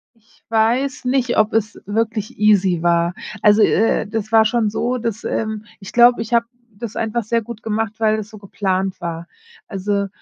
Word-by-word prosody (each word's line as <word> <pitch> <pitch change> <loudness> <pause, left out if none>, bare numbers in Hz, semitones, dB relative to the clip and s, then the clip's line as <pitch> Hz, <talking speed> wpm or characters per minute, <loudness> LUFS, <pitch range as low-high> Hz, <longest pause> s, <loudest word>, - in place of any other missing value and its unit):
Ich 225 0 -30
weiß 235 +5 +1
nicht, 255 -1 +1
ob 215 0 +2
es 215 -1 -1
wirklich 220 0 -2
easy 195 -5 +3
war. 170 0 +2 0.3
Also, 210 +1 +5
äh, 225 +1 +2
das 215 0 -4
war 225 -1 +6
schon 220 0 +1
so, 245 +4 -1
dass 230 -2 -4
ähm, 215 -1 -3 0.2
ich 195 +1 -10
glaube, 240 0 +5
ich 225 +1 -3
habe 235 0 +4 0.3
das 220 +1 -8
einfach 225 +1 -1
sehr 230 +2 +1
gut 225 0 -9
gemacht, 220 -1 -2
weil 220 -1 +2
das 215 -1 -6
so 220 - -12
geplant 190 -2 -2
war. 170 -1 -5 0.4
Also, 200 0 -2
215 Hz, 180 wpm, -19 LUFS, 200-230 Hz, 0.4 s, war